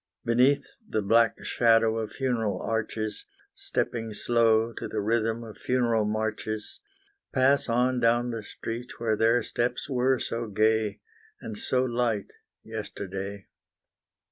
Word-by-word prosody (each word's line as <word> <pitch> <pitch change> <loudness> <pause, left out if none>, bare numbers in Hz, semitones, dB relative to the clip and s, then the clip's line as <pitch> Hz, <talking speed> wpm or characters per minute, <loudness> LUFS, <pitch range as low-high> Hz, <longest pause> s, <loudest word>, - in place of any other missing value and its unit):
Beneath 130 +4 +3 0.2
the 110 - 0
black 115 +3 +4
shadow 115 -1 +3
of 110 -1 -4
funeral 120 -6 -1
arches, 110 - -3 0.3
Stepping 115 - -3
slow 115 -1 +3
to - - -5
the 110 - -3
rhythm 115 +2 0
of 110 -2 -11
funeral 120 -4 +1
marches; 110 0 -3 0.5
Pass 135 0 +3
on 125 +2 +2
down 120 +1 +2
the 115 -1 -4
street 115 +3 -7
where 115 -2 +1
their 115 +2 +3
steps 120 +2 -2
were 130 -1 +2
so 115 -1 -3
gay, 110 0 +1 0.4
And 110 - -7
so 125 +4 0
light, 120 -4 -1 0.3
yesterday. 100 -2 -6
115 Hz, 125 wpm, -27 LUFS, 110-120 Hz, 0.5 s, black